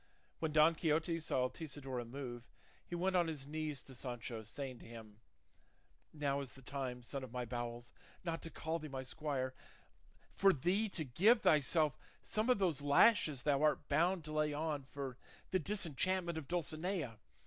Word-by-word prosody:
When 160 -1 0
Don 155 +2 +6
Quixote 165 +1 +1
saw 130 -5 +1
Altisidora 135 -4 -5
move, 120 -1 -6 0.4
he 175 - -4
went 185 +2 +1
on 175 -2 +4
his 150 -4 -3
knees 155 -1 -3
to 135 - -12
Sancho 120 -2 -5
saying 130 +3 -6
to - - -12
him, 110 -2 -11 0.9
"Now 140 -2 0
is 135 - -7
the 135 - -13
time, 125 -2 -4
son 135 +2 -4
of 130 - -7
my 125 0 -2
bowels, 120 0 -5 0.3
not 165 -2 -2
to 165 - -6
call 165 0 -2
thee 155 - -6
my 135 -2 -4
squire, 130 -2 -2 0.8
for 195 -1 +5
thee 185 +9 +1
to 170 -4 -3
give 200 - +5
thyself 150 0 +4 0.2
some 215 +3 0
of 250 - +5
those 175 -8 +1
lashes 145 - +5
thou 145 -1 +3
art 150 -1 +2
bound 170 +4 +3
to 155 - -5
lay 150 -1 +2
on 150 -2 -2
for 135 -3 -5 0.3
the 185 - +3
disenchantment 180 -1 -1
of 145 - -10
Dulcinea. 165 - -2
150 Hz, 170 wpm, -37 LUFS, 130-165 Hz, 0.9 s, Don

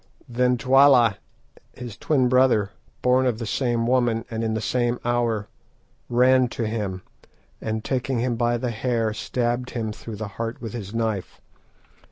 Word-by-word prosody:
_' - - -36 0.2
"Then 125 +1 +1
Twala, 130 -4 +5 0.6
his 120 -4 -8
twin 135 -5 +1
brother, 125 -6 +3 0.3
born 130 +1 +3
of 120 -3 0
the 115 - -5
same 120 +1 0
woman, 120 -2 +1
and 115 0 -2
in 110 -1 -1
the - - -1
same 120 +2 0
hour, 120 -3 0 0.6
ran 125 +1 +4
to 120 -1 -4
him, 105 -4 -3 0.6
and 110 0 -3
taking 130 0 -1
him 120 0 0
by 120 +1 +1
the 120 0 -2
hair, 115 -1 -1
stabbed 120 +2 -2
him 110 -2 -2
through 110 +1 -8
the 105 +1 -5
heart 115 0 -3
with 115 -2 -7
his 105 -5 -6
knife. 110 -4 -3
120 Hz, 165 wpm, -24 LUFS, 110-125 Hz, 0.6 s, Twala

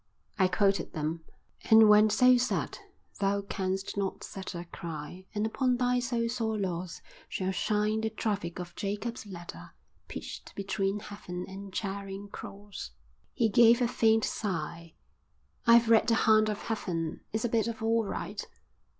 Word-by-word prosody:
I 190 - +5
quoted 195 -1 +1
them. 160 +1 -3 0.5
"And 220 0 +9
when 210 +1 +7
so 250 +4 +6
sad, 250 +1 -1 0.4
thou 200 0 +1
canst 190 -1 -3
not 195 -1 -2
sadder, 185 -2 -6
Cry, 170 +3 -7
and 210 +1 +1
upon 250 +2 +1
thy 250 0 +2
so 240 -1 -1
sore 225 -2 -1
loss 180 -3 -3 0.3
Shall 190 0 -1
shine 215 +2 0
the 220 - 0
traffic 205 -5 -2
of 175 -1 -7
Jacob's 210 +3 -4
ladder 170 - -9 0.3
Pitched - - -8
between 195 +1 -1
Heaven 180 -4 -7
and 195 +1 -8
Charing 195 0 -4
Cross." 200 0 -8 0.4
He 230 - +3
gave 235 +2 +6
a 245 - +3
faint 225 -2 +3
sigh. 170 -4 -4 0.7
"I've 235 0 +7
read 225 -1 +5
The 230 - +4
Hound 215 -1 +4
of 210 -1 -4
Heaven. 170 -7 -3
It's 220 +2 -1
a - - +1
bit 225 -1 +1
of 225 -1 -4
all 225 0 +3
right." 200 - -4
205 Hz, 150 wpm, -30 LUFS, 190-225 Hz, 0.7 s, And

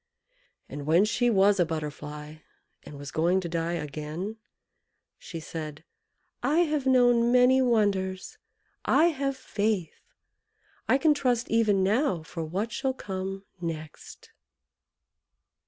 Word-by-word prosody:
And 145 0 -7
when 170 +6 +5
she 240 +2 +1
was 200 -2 +4
a - - +6
Butterfly, 150 -1 -6 0.4
and 145 - -11
was 140 0 -8
going 175 +4 +2
to 175 - -4
die 165 0 -2
again, 155 +7 -5 0.8
she 165 - -7
said 155 -1 -7 0.6
"I 310 +4 +3
have 300 -5 0
known 245 -2 +4
many 250 +1 +5
wonders 200 -6 0 0.4
I 335 +2 +4
have 275 -3 -2
faith 205 -8 -2 0.9
I 265 - +5
can 305 +1 +4
trust 250 -4 0
even 215 -4 +3
now 200 - +1
for 165 +1 -6
what 195 +8 -3
shall 265 -1 -2
come 195 -2 -5 0.2
next!" 155 -2 -7
195 Hz, 125 wpm, -27 LUFS, 160-245 Hz, 0.9 s, a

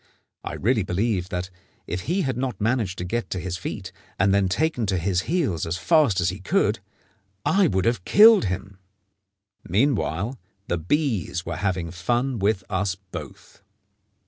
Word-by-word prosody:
I - - -5
really 115 +2 +1
believe 95 0 -1
that, 90 +1 -4 0.3
if 90 - -3
he 185 +2 +1
had 130 -3 -1
not 125 0 -3
managed 110 -4 0
to - - -4
get 120 +6 -2
to 95 - -3
his 90 0 -4
feet, 85 - -6 0.3
and 95 +1 +3
then 100 -1 +3
taken 125 - 0
to 95 -1 +1
his 90 +1 0
heels 140 - 0
as 85 +2 -2
fast 145 - +3
as 85 0 +2
he 95 +2 -5
could, 95 - +1 0.7
I 195 -1 +4
would 95 - 0
have 115 -5 +1
killed 220 - +7
him. 95 +1 -4 0.8
Meanwhile 110 - 0 0.3
the 85 - -1
bees 100 - -1
were 80 - -4
having 90 -3 -1
fun 120 +8 -1
with 100 0 +1
us 95 -1 -1
both. 95 +1 -11
100 Hz, 165 wpm, -24 LUFS, 90-125 Hz, 0.8 s, killed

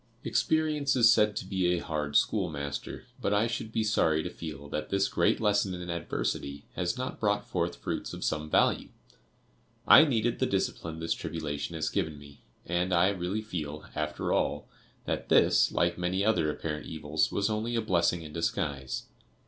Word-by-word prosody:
"Experience 155 -3 +1
is 115 -2 +7
said 105 -1 +3
to 95 - -3
be 95 -1 0
a 90 0 +2
hard 75 -3 -3
schoolmaster, 70 -2 -1 0.2
but 100 - +1
I 105 +2 +3
should 115 -1 -3
be 110 0 0
sorry 80 -7 +2
to 90 - -5
feel 75 -5 -8
that 75 +1 -4
this 100 0 +2
great - - +2
lesson 105 -3 +1
in 90 0 -5
adversity 70 -4 -3
has 90 +7 -1
not 130 0 -4
brought 105 -1 0
forth 85 -1 -1
fruits - - -4
of - - -6
some 75 0 -1
value. - - +2 1.0
I 155 - +10
needed 120 -4 0
the - - +2
discipline 80 -1 -2
this 80 0 0
tribulation 80 0 -4
has 80 -1 -1
given 80 -2 -1
me, 70 -1 -14 0.2
and 90 +2 0
I 90 +2 +4
really 100 +2 -2
feel, 75 -7 -5
after 75 0 -2
all, - - 0 0.4
that - - -3
this, - - +5
like 85 0 +1
many 90 +3 0
other 105 -8 +2
apparent 75 0 -4
evils, 75 -1 -1
was 100 - +1
only 110 +2 -1
a - - +2
blessing 90 -4 +1
in 75 -1 -10
disguise. 70 -5 -2
90 Hz, 175 wpm, -29 LUFS, 75-105 Hz, 1.0 s, I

